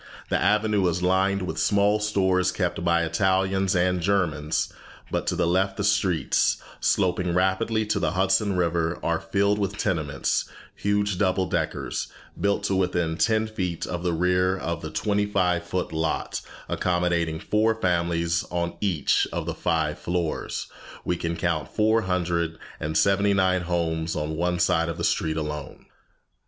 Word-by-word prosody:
The - - +1
avenue 105 -2 +2
is 90 +1 -1
lined 95 +1 +2
with 80 -3 -4
small 105 +1 +3
stores 95 -3 +1
kept 90 -3 -2
by 85 0 +3
Italians 95 +2 +1
and 90 0 +2
Germans, 80 -5 0 0.4
but - - -2
to - - +1
the - - +1
left 95 +3 +1
the 100 - -1
streets, 100 -4 +2 0.2
sloping 90 -2 +1
rapidly 110 +4 +1
to 105 - 0
the - - 0
Hudson 95 +1 +2
River, 85 -1 0
are - - +1
filled 100 +1 +1
with 100 +1 -2
tenements, 80 -9 0 0.3
huge 100 -2 0
double 95 -1 +2
deckers, - - -2 0.3
built 100 +2 +1
to 100 -1 0
within 90 -3 0
ten 110 +4 +2
feet 95 -6 -3
of 85 - -4
the 90 0 0
rear 90 +2 +2
of 85 -2 -3
the 80 - -5
twenty 105 +3 0
five 90 -3 +1
foot 95 -4 -2
lot, 80 0 -2 0.3
accommodating 85 -3 0
four 110 +4 +1
families 85 -4 0
on 85 -1 -2
each 90 -8 +2
of - - -3
the - - -2
five 80 -2 -1
floors. 85 -2 -2 0.4
We 90 - +1
can 85 0 -3
count 85 -4 -1
four 110 +1 +3
hundred 85 -3 -1 0.2
and 80 +1 -1
seventy 100 +1 +3
nine 95 -1 +2
homes 85 -2 -1
on 75 +1 -2
one 90 +2 0
side 85 - +2
of - - -4
the - - -4
street 80 0 0
alone! 75 -2 -5
90 Hz, 160 wpm, -25 LUFS, 85-100 Hz, 0.4 s, small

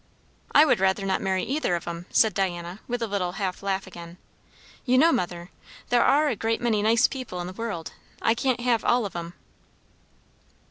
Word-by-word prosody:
"I 300 - +7
would 275 - +2
rather 190 +1 +1
not 190 -1 0
marry 190 -1 0
either 275 - 0
of 170 - -6
'em," 170 +1 -6
said 220 -3 +3
Diana, 175 0 -3
with 245 -1 -2
a - - -1
little 190 -4 -2
half 190 -2 -3
laugh 195 -1 -2
again. 170 -2 -11 0.7
"You 255 -1 +2
know, 325 +5 +6
mother, 175 - -3 0.4
there 245 -1 +4
are 295 +3 +4
a 260 - 0
great 225 +2 -1
many 225 -3 +1
nice 225 +3 +4
people 255 -9 -6
in 175 - -4
the 180 - -7
world. 205 -6 -5 0.3
I 225 - +2
can't 250 +1 -1
have 240 -2 +1
all 240 -2 +2
of 195 - -7
'em." 170 0 -6
200 Hz, 195 wpm, -25 LUFS, 180-240 Hz, 0.7 s, I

